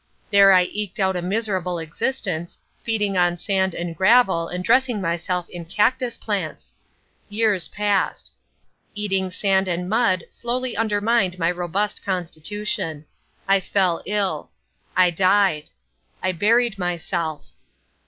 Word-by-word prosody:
There 200 -1 +7
I 185 -1 +6
eked 210 +2 -4
out 190 -1 +2
a 180 - -1
miserable 185 -2 -1
existence, 170 +1 -3 0.2
feeding 210 -4 0
on 175 0 +2
sand 190 -1 0
and 170 -1 -4
gravel 190 -3 +4
and 180 +1 -5
dressing 245 +2 +3
myself 175 0 -2
in 175 -1 -8
cactus 230 +7 0
plants. 195 -7 -4 0.6
Years 210 -3 +1
passed. 205 -2 -1 0.6
Eating 195 -2 0
sand 190 +1 +1
and 180 0 -2
mud 205 -4 +2
slowly 250 +1 -3
undermined 210 -3 +1
my 165 0 +1
robust 180 +4 -2
constitution. 175 -3 -3 0.4
I 195 0 +5
fell 185 -3 +1
ill. 195 -7 -1 0.5
I 180 -1 +5
died. 185 -3 +2 0.5
I 185 - +1
buried 215 +4 +2
myself. 170 -3 -3
190 Hz, 125 wpm, -22 LUFS, 175-210 Hz, 0.6 s, There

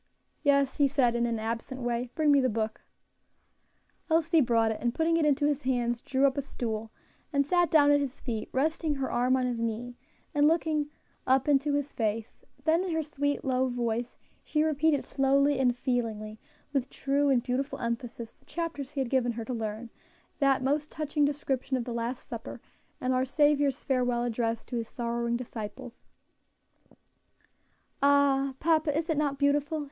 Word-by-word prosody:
"Yes," 280 -2 +2
he 285 -2 +4
said, 260 -4 +2
in 235 0 +1
an 230 -1 -1
absent 230 +4 -4
way; 240 0 -2
"bring 305 -2 +3
me 280 -1 +5
the 255 - +2
book." 220 -1 -2 1.3
Elsie 325 0 +3
brought 230 -3 +2
it, 220 - -4
and 240 0 -1
putting 330 +1 +2
it 320 -2 +3
into 290 0 +2
his 290 -1 +1
hands, 240 -2 0
drew 270 0 +1
up 275 +1 +2
a - - 0
stool 225 -5 -4 0.4
and 280 -2 +2
sat 350 +2 +2
down 290 -2 +5
at 290 - +5
his 275 -2 -4
feet, 225 -4 -4
resting 310 +2 0
her 270 -1 -3
arm 250 +2 +2
on 255 - 0
his 245 -2 -2
knee, 235 +2 -3 0.4
and 290 -1 +4
looking 310 -2 +1 0.4
up 260 +1 +3
into 285 0 +3
his 285 0 -2
face; 220 0 -3 0.2
then 325 +4 +3
in 375 - -3
her 320 -1 0
sweet, 285 -1 -2
low 260 0 +1
voice, 240 -1 -2 0.3
she 305 -1 +1
repeated 310 -1 +2
slowly 275 +1 +2
and 250 -2 +2
feelingly, 220 -4 -2 0.3
with 270 -2 0
true 280 +1 0
and 250 -3 +3
beautiful 270 +3 -2
emphasis, 235 -1 -4
the - - -32
chapters 310 -4 -4
he 285 - -3
had 260 - -2
given 245 -3 +2
her 230 0 -5
to 255 - -4
learn; 225 0 -4 0.5
that 275 -2 +3
most 290 +3 0
touching 300 -1 0
description 275 -2 -1
of 245 - -2
the 245 - -4
Last 235 +2 -3
Supper, - - -7 0.4
and 255 0 0
our 255 0 +2
Saviour's 290 0 +2
farewell 250 -3 +1
address 230 -1 -1
to 245 - -4
His 230 -1 -4
sorrowing 235 0 -2
disciples. 240 +1 -7 2.0
"Ah! 275 -1 +3
papa, 310 -2 +2
is 325 0 -1
it 320 - +1
not 285 -2 0
beautiful?" 290 +2 +1
265 Hz, 180 wpm, -29 LUFS, 240-290 Hz, 2.0 s, me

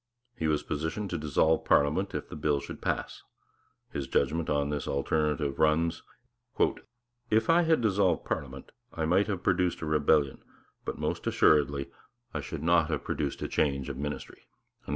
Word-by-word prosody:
He 80 - -1
was 75 -1 +1
petitioned 80 +7 -3
to 85 - -1
dissolve 80 +2 +2
parliament 75 +7 +2
if - - -4
the - - -9
bill 75 -1 +1
should - - -9
pass; - - -2 0.7
his 70 -2 -3
judgment 80 +4 0
on 70 -1 +1
this 75 -1 -3
alternative 75 0 0
runs: 80 +1 +2 1.3
'If 110 +8 +3
I 170 +1 +5
had 160 -5 +3
dissolved 95 -6 +2
parliament, - - -5 0.2
I 80 -3 -2
might 95 +6 +3
have 95 -4 -3
produced 90 -2 +1
a - - -3
rebellion, 75 -2 +2 0.4
but - - -4
most - - -3
assuredly 70 -2 +3 0.4
I - - -2
should 70 - -6
not 85 -1 +3
have 80 - -2
produced 70 -2 -3
a - - -1
change 70 -2 0
of 70 - -5
ministry.' 75 +1 -5
80 Hz, 160 wpm, -29 LUFS, 75-85 Hz, 1.3 s, I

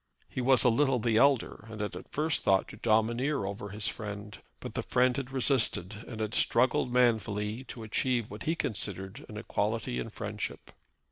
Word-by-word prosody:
He - - -4
was 125 -2 +5
a 125 - +6
little 135 +2 +3
the 115 -1 +1
elder, 135 -4 +3
and 110 -1 -8
had 105 0 -3
at - - -10
first 155 +1 0
thought 95 0 +3
to - - -10
domineer 120 +4 +1
over 100 +1 -5
his 105 +3 -1
friend. 105 -2 -5 0.2
But - - -7
the - - -1
friend 125 0 +2
had 135 -1 -3
resisted, 130 -7 +2
and 110 - -7
had 110 0 -2
struggled 125 +1 +3
manfully 110 -2 +1
to 115 - -8
achieve 120 +1 0
what 105 0 -8
he 160 - +1
considered 100 - -4
an 105 - -7
equality 110 +3 -1
in 115 - -4
friendship. 105 -1 -5
115 Hz, 185 wpm, -30 LUFS, 105-125 Hz, 0.2 s, a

